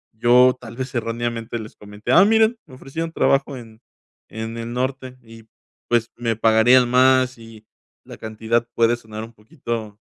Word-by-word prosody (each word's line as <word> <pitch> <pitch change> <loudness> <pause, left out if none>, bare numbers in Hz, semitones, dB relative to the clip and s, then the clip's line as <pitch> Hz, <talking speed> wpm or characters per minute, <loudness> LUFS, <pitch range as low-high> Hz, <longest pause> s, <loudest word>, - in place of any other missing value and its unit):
yo 125 +3 +5
tal 115 +2 -11
vez 130 0 -5
erróneamente, 115 0 -3
les 110 - -10
comenté: 105 +3 -7
"Ah, 180 - +7
miren, 220 +2 +3
me 130 - -14
ofrecieron 160 +5 -6
trabajo 135 -3 +1
en 115 -2 -13 0.5
en 110 +1 -6
el 115 0 -6
norte, 130 0 -4
y, 115 -1 -15 0.5
pues, 120 -1 +1
me 115 -1 -1
pagarían 115 +3 +4
más", 130 0 +3
y 115 -1 -14 0.4
la - - -11
cantidad 110 +2 -2
puede 115 +1 +3
sonar 110 -2 -9
un 115 +1 -11
poquito 110 0 -7
120 Hz, 160 wpm, -21 LUFS, 110-130 Hz, 0.5 s, Ah